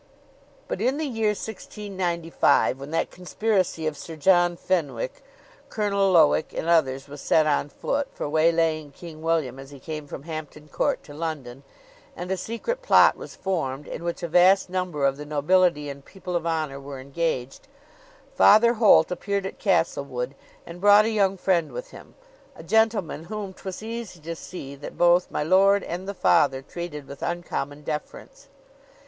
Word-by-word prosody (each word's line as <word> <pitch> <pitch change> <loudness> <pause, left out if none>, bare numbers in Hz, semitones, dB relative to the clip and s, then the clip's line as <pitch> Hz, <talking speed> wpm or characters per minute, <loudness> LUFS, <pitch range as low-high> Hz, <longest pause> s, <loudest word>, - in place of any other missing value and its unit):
But - - -4
in 265 +3 +1
the 315 - -2
year 225 -5 -1
1695, 190 -9 0
when 140 +1 -8
that 165 - -1
conspiracy 185 -2 -1
of 155 -1 -1
Sir 160 +3 -9
John 175 +2 +3
Fenwick, 185 - -2 0.5
Colonel 200 -3 +1
Lowick, 155 -2 +4
and - - -4
others, 135 -5 +2
was 145 0 -10
set 155 - +3
on 145 -1 +1
foot, 280 - -2
for - - -5
waylaying 155 -1 +1
King 160 -1 -11
William 160 -6 -1
as 135 0 -10
he 140 -1 -12
came 155 0 -6
from 140 - -8
Hampton 155 -1 -8
Court - - -1
to 145 - -12
London, 145 -5 -5 0.5
and 180 +1 -6
a - - +2
secret 230 - -4
plot - - +6
was - - -10
formed, 150 -7 -3
in - - -6
which 170 0 -4
a - - -1
vast 180 +3 +4
number 180 -6 -1
of 135 0 +1
the 150 - -7
nobility 150 +1 +2
and 140 -1 -8
people 180 0 -7
of 170 -1 -1
honor 155 -4 -2
were 140 -1 -8
engaged, 135 - -3 0.7
Father 235 +3 +6
Holt 220 -5 +5
appeared 200 +2 -2
at 195 - -6
Castlewood, 140 - 0 0.3
and 170 +1 -10
brought 205 +1 +7
a 225 - 0
young 195 -3 +2
friend 175 -3 +1
with - - -7
him, - - -14 0.4
a - - -11
gentleman 220 -8 +1
whom 205 0 -6
'twas 190 +2 -8
easy 225 -5 -6
to 165 +2 -6
see 160 -5 -8
that 140 +1 -9
both 175 +1 +4
my - - -2
lord 195 +4 +4
and 180 +3 -5
the 200 - -4
Father 135 -6 +3
treated 150 -2 -7
with 140 - -10
uncommon 150 -4 -4
deference. 150 0 -7
170 Hz, 170 wpm, -25 LUFS, 150-195 Hz, 0.7 s, brought